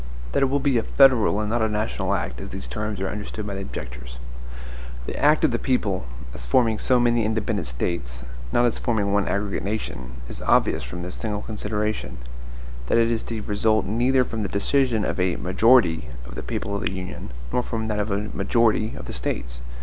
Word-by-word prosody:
That - - +1
it 135 - +5
will 140 +2 +2
be 135 -4 +3
a - - -2
federal 125 -7 +5
and 105 0 -1
not 120 0 +1
a 110 - +2
national 105 -2 0
act, 65 -9 -3
as - - -6
these - - -6
terms 105 - -3
are 95 - -1
understood 105 +1 -5
by 100 - -4
the 95 - -4
objectors; 60 -8 -7 0.9
the - - -4
act 150 +2 +4
of - - +3
the 120 - 0
people, 100 - 0 0.3
as 60 - -8
forming 110 - +3
so 125 -2 +3
many 120 -1 +3
independent 110 - -1
States, - - -3 0.3
not 120 - +4
as 120 - +1
forming 105 -5 +1
one 100 0 +2
aggregate 100 0 -1
nation, 80 - -4
is - - -8
obvious - - +3
from 90 +1 -6
this 90 - -5
single 105 -2 -3
consideration, 105 - -2 0.7
that - - +3
it 115 0 +4
is 115 - 0
to 115 -2 -4
result 110 +1 +2
neither 125 +5 +3
from 115 -2 -4
the 100 - -2
decision 115 +1 +2
of - - -2
a 90 -1 +2
MAJORITY 90 - +4 0.2
of - - -9
the - - -5
people 100 - -3
of 100 - -2
the - - -1
Union, 95 -7 -6 0.2
nor 125 - +3
from 115 -2 -3
that 105 -1 -1
of 105 +1 -1
a 100 +1 -1
MAJORITY 110 +2 +2
of - - -7
the - - -6
States. - - -4
105 Hz, 210 wpm, -24 LUFS, 95-115 Hz, 0.9 s, it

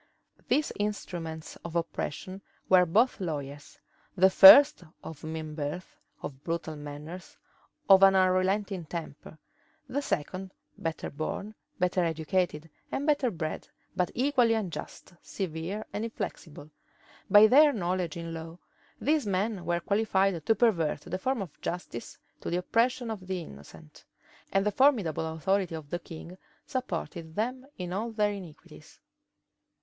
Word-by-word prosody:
These 300 - +1
instruments 170 -6 -4
of 170 0 -9
oppression 170 +3 -3 0.3
were 180 -1 +5
both 225 +10 +3
lawyers; 145 -4 -5 0.4
the 190 +1 +6
first 280 +6 +9 0.2
of 160 -2 -9
mean 160 -1 -5
birth, 150 +4 -5 0.3
of 135 0 -7
brutal 165 -2 -3
manners, 150 +4 -9 0.5
of 195 -1 +8
an 195 0 +7
unrelenting 185 0 +1
temper; 155 -1 -8 0.5
the 275 +2 -2
second 185 - -3 0.2
better 165 -1 -4
born, 180 +8 -4 0.2
better 180 0 +1
educated, 165 0 -1 0.2
and 280 - -2
better 290 -4 +2
bred, 160 -6 -5 0.3
but 180 - +1
equally 250 -3 +3
unjust, 180 -4 -6
severe, 185 +3 -4
and 210 - -2
inflexible. 155 -9 -6 0.6
By 205 +2 +9
their 290 +7 +7
knowledge 180 - -2
in 165 0 -6
law, 165 +1 -8 0.4
these 300 -5 +1
men 195 0 -1
were 175 0 0
qualified 195 -4 +1
to 225 - +4
pervert 170 -12 +1
the 180 +3 -5
forms 255 0 -1
of 165 -6 -14
justice 170 -9 -5 0.2
to - - -5
the 175 - 0
oppression 230 +5 0
of 190 -4 -7
the 190 -1 -2
innocent; 75 - -14 0.5
and 195 +1 +2
the 210 - +2
formidable 205 - +2
authority 185 +2 0
of 155 -3 -9
the 175 - -2
king 170 +2 -10 0.3
supported 170 - -5
them 255 +5 -2
in 180 -1 -5
all 220 +5 -2
their 210 -2 +1
iniquities. 185 -7 -11
185 Hz, 135 wpm, -29 LUFS, 160-210 Hz, 0.6 s, first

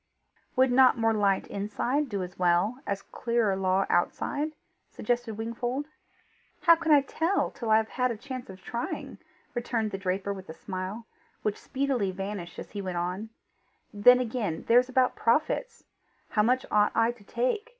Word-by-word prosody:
"Would 260 -1 +4
not 255 0 +6
more 225 -1 +2
light 200 -3 +2
inside 240 +8 -1
do 200 -4 -2
as 180 +1 -9
well 180 +7 +2
as 200 0 -2
clearer 235 -5 0
law 190 0 +1
outside?" 290 - 0 0.4
suggested 240 -3 -2
Wingfold. 240 +5 -3 0.8
"How 335 -1 +7
can 325 -1 -1
I 290 -2 +7
tell 325 +7 0
till 230 - -5
I 220 - +6
have 220 0 0
had 250 0 0
a 230 - -3
chance 255 0 -7
of 185 -1 -11
trying?" 235 0 -5 0.3
returned 235 -3 -1
the 195 - -4
draper 195 +1 -1
with 190 -3 -10
a 160 - -7
smile, 190 +5 -5 0.4
which 210 -1 -2
speedily 265 -7 -1
vanished 195 -2 -5
as - - -8
he 205 - -4
went 185 -2 -4
on: 180 +5 -3 0.6
"Then 245 +5 +7
again, 225 -9 -2
there's 245 +2 +5
about 255 0 +2
profits! 315 - 0 0.5
How 210 - +2
much 250 +4 +2
ought 210 0 +3
I 230 +1 +3
to 240 -3 -16
take? 255 - -1
225 Hz, 170 wpm, -28 LUFS, 195-255 Hz, 0.8 s, How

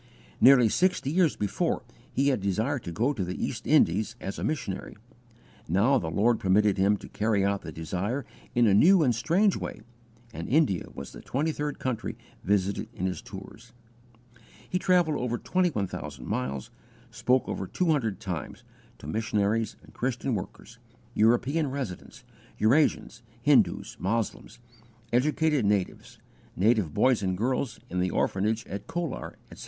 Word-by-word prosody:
Nearly 125 -3 +7
sixty 175 - +1
years 170 -2 +3
before 135 - -1 0.3
he 140 +2 +2
had 130 -7 0
desired 110 +8 0
to 85 - -4
go 120 - +1
to 105 -8 -2
the 90 +1 -4
East - - -4
Indies 105 +7 +3
as 95 - -5
a - - -4
missionary; 105 -14 -3 0.7
now 110 - +3
the 80 - -4
Lord 110 +7 +2
permitted 100 +1 +3
him 100 +2 +3
to - - -11
carry 105 -2 0
out 100 0 0
the 80 - -7
desire 95 - -3 0.3
in 120 0 +5
a 105 - +4
new 170 - +6
and 125 -4 +3
strange 180 - +2
way, - - -6 0.5
and 85 - -6
India 135 - +2
was 70 -1 -7
the - - -11
twenty 150 +5 -1
third 150 -1 -3
country 120 -4 -3 0.3
visited 100 0 0
in 90 - -3
his 95 -1 -2
tours. 100 +4 -11 0.9
He 180 - -1
travelled 180 -5 +2
over 120 -1 -1
21,000 100 - -2
miles, 65 +1 -3 0.3
and 120 -2 -23
spoke 125 +3 +2
over 95 - -3
two 180 - 0
hundred 115 -10 0
times, 90 -8 -5 0.3
to - - -13
missionaries 110 +4 0
and - - -17
Christian 125 +1 -2
workers, 95 -4 -7 0.3
European 130 +7 +2
residents, 130 -9 -6 0.3
Eurasians, 115 -1 +2 0.2
Hindus, 145 -1 +3
Moslems, 110 +3 -2 0.6
educated 150 +2 +2
natives, 100 -2 -1 0.4
native 105 -4 +2
boys 125 - +3
and 95 -2 -1
girls 125 +1 -1
in 90 - -3
the 90 0 +1
orphanage 105 +5 0
at 100 0 -7
Colar, 170 -5 -4 0.2
etc. - - -12
115 Hz, 155 wpm, -27 LUFS, 95-140 Hz, 0.9 s, Nearly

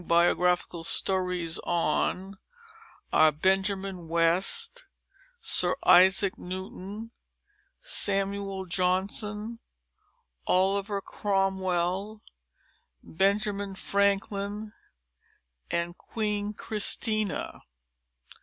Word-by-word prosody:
BIOGRAPHICAL 175 0 +2
STORIES 180 -2 -1 1.5
BENJAMIN 190 +3 +2
WEST, 185 - +1 0.5
SIR 180 0 +2
ISAAC 190 +3 +6
NEWTON, 190 +4 -7 0.7
SAMUEL 195 - 0
JOHNSON 200 +5 -1 0.9
OLIVER 195 +2 +1
CROMWELL, 195 +1 -1 0.8
BENJAMIN 200 +2 0
FRANKLIN, 200 +2 -1 1.3
QUEEN 210 -2 -3
CHRISTINA. 215 -1 -1
195 Hz, 50 wpm, -28 LUFS, 180-205 Hz, 1.5 s, ISAAC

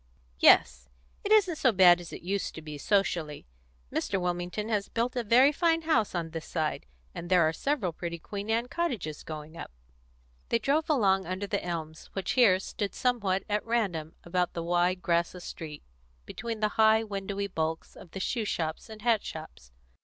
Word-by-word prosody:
"Yes. - - +5 0.3
It 410 - -3
isn't 390 -7 +4
so 255 - +4
bad 180 -3 +6
as 175 - -10
it - - -9
used 195 +2 -2
to 160 - -7
be, 150 -2 -7
socially. 170 -6 0 0.5
Mr. 195 - -1
Wilmington 180 +4 -2
has 210 -3 -1
built 240 +2 -1
a 245 - -1
very 250 +6 +6
fine 330 +1 +1
house 245 - +1
on 165 -2 -3
this 165 -1 -6
side, 155 - -2 0.3
and 175 - -7
there 180 -3 +5
are 160 - 0
several 225 - -1
pretty 170 +1 -5
Queen 200 +5 -7
Anne 230 +2 +1
cottages 245 - -3
going 155 0 -8
up." - - -7 0.8
They - - +3
drove 285 +8 0
along 195 -9 +3
under 185 +2 -3
the 200 0 -2
elms 160 -3 -5
which 195 -1 -2
here 225 -8 +5
stood 200 +1 -4
somewhat 205 -7 0
at 210 0 0
random 190 -9 -1
about 180 0 -1
the 170 - -4
wide, 175 +1 +1
grassless 170 +1 0
street, 150 -2 -8 0.4
between 225 0 -5
the 215 - +2
high, 220 0 +5
windowy 200 -1 -4
bulks 160 -4 -3
of 175 - -13
the 195 - -7
shoe 225 +4 -1
shops 160 0 -3
and 215 -1 -10
hat 230 -3 +3
shops. 155 - -9
190 Hz, 185 wpm, -29 LUFS, 170-225 Hz, 0.8 s, bad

